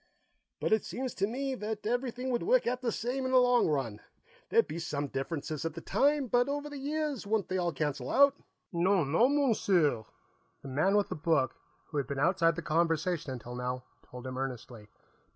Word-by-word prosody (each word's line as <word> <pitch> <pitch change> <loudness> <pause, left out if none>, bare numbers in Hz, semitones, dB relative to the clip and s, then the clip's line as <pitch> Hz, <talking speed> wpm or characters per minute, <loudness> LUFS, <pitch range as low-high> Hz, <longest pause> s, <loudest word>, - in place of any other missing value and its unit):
"But - - +1
it 220 - +3
seems 255 -1 -4
to 195 - 0
me 270 +4 -2
that 215 -3 -5
everything 245 +2 -1
would 240 - 0
work - - +3
out 250 +1 -1
the 240 -3 0
same 245 +5 -2
in 260 - -1
the 260 - +5
long 245 -1 +5
run. 135 -9 -1 0.5
There'd 460 0 +4
be 170 - -5
some 145 -3 -2
differences 145 +2 -3
at 165 -1 -3
the - - -5
time, 285 - +2
but 245 +2 +2
over 290 +1 -3
the 285 - -6
years 290 -4 -2
wouldn't 215 -1 0
they 185 0 0
all 175 -1 0
cancel 145 -5 -2
out?" 280 0 +6 0.4
"Non, 170 -4 +2
non, 250 - +4
Monsieur!" 185 - +2 0.6
the 140 - -7
man 160 +10 +2
with 205 - +1
the - - -3
book, 155 -4 +1 0.4
who 150 - -3
had 140 - -1
been 140 - -4
outside 165 +2 +3
the 170 - -5
conversation 165 -1 0
until 120 -1 -7
now, 125 0 -3 0.3
told 125 0 -9
him 130 0 -4
earnestly. 125 -4 -6
185 Hz, 200 wpm, -31 LUFS, -, 0.6 s, out